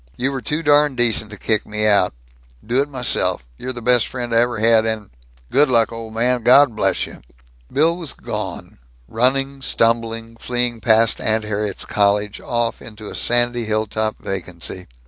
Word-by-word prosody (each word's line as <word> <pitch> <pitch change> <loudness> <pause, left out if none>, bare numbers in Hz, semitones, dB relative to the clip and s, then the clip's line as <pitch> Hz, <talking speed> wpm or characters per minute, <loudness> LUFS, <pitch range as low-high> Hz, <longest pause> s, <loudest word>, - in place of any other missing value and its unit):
You 130 +3 -1
were 135 -2 -4
too 150 +7 -2
darn 145 -2 +3
decent 115 -3 +2
to 105 - -9
kick 110 +2 0
me 105 0 -1
out. 100 -8 +3 0.5
Do 125 +4 +1
it 145 - -3
myself. 125 - 0
You're 130 - -4
best 120 -1 +3
friend 120 -2 -5
I 115 - +4
ever 120 0 +1
had 110 +1 +4
and 110 -3 -3 0.4
Good 145 +1 +3
luck, 115 -3 +4
old 115 -1 -8
man! 125 +2 +1
God 125 +1 +5
bless - - +1
you!" - - -13 0.5
Bill 160 +4 +2
was 165 -6 -5
gone, - - -6 0.3
running, 135 - 0
stumbling, 115 -2 -1
fleeing 120 -2 -2
past 115 -1 +3
Aunt 110 0 0
Harriet's 105 -1 -4
cottage, 105 0 0
off 120 -1 -2
into 105 -1 -9
a - - -8
sandy 120 0 +2
hilltop 110 0 -2
vacancy. 90 -1 -6
115 Hz, 165 wpm, -19 LUFS, 110-125 Hz, 0.5 s, God